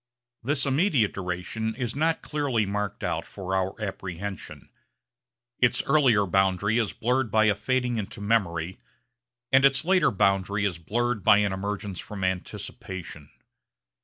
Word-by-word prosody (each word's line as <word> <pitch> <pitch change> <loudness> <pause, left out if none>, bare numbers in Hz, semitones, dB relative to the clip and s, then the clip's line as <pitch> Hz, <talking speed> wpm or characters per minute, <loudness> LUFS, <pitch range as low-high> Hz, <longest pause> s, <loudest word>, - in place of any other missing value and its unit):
This 135 +3 0
immediate 140 - +2
duration 95 +5 -3
is 125 -2 -3
not 160 +3 0
clearly 140 -8 0
marked 105 +1 -3
out - - -1
for 95 -1 -5
our 95 +1 -1
apprehension. 95 -2 -6 0.9
Its 125 - +3
earlier 135 -8 +4
boundary 95 +4 +2
is 110 - 0
blurred 125 +1 0
by 110 +1 +3
a 105 - +4
fading 125 +3 -1
into 105 -2 -5
memory, 95 -5 0 0.7
and 135 0 +5
its 135 +2 +4
later 180 -5 +4
boundary 100 +1 +1
is 90 -4 -2
blurred 120 +6 -1
by 100 - +6
an 105 -2 +1
emergence 100 -1 -4
from 100 -2 -6
anticipation. 90 -3 -5
105 Hz, 135 wpm, -26 LUFS, 95-125 Hz, 0.9 s, by